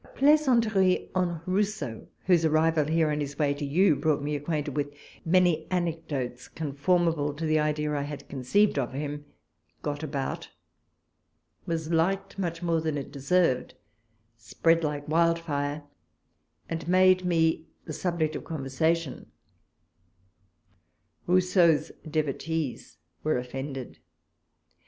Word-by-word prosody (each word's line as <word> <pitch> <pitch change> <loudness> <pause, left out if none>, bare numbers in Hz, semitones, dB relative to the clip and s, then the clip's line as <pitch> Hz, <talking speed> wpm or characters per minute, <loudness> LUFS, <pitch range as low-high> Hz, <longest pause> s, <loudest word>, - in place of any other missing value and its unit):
A - - -19
plaisanteric 235 -10 +3
on 175 -3 0
Rousseau, 185 - -2 0.2
whose 175 -3 +4
arrival 160 0 +3
here 160 0 +2
in 150 - -1
his 140 -1 -5
way 145 -2 +2
to 145 +1 -6
you 155 +4 +3
brought 150 0 0
me 150 +1 -2
ac 145 0 -6
quainted 150 -2 -1
with 145 -1 -1 0.3
many 170 -2 +3
anecdotes 155 -8 -3
conformable 155 0 0
to 160 +2 -4
the 155 0 +2
idea 150 0 0
I 145 - 0
had 145 0 -6
conceived 145 +7 +2
of 130 -1 -2
him, 145 +1 -4 0.6
got 145 0 -3
about, 140 -3 -4 1.2
was 160 -1 -2
liked 195 +4 0
much 170 -2 -3
more 165 -2 +1
than 155 -2 -1
it 140 - -6
deserved, 140 -1 +1 0.6
spread 165 +10 +1
like 150 -1 -2
wild 165 +2 +3
fire, 145 -2 -3 0.8
and 165 -1 -4
made 185 0 +5
me 160 -2 +1 0.2
the - - -6
subject 170 -4 -1
of - - -5
conversa 155 +2 0
tion, 165 -6 -8 2.0
llousseau's 180 -4 +3 0.2
devotees 155 - -2 0.3
were 155 - +1
offended. 130 - -6
155 Hz, 130 wpm, -27 LUFS, 145-170 Hz, 2.0 s, made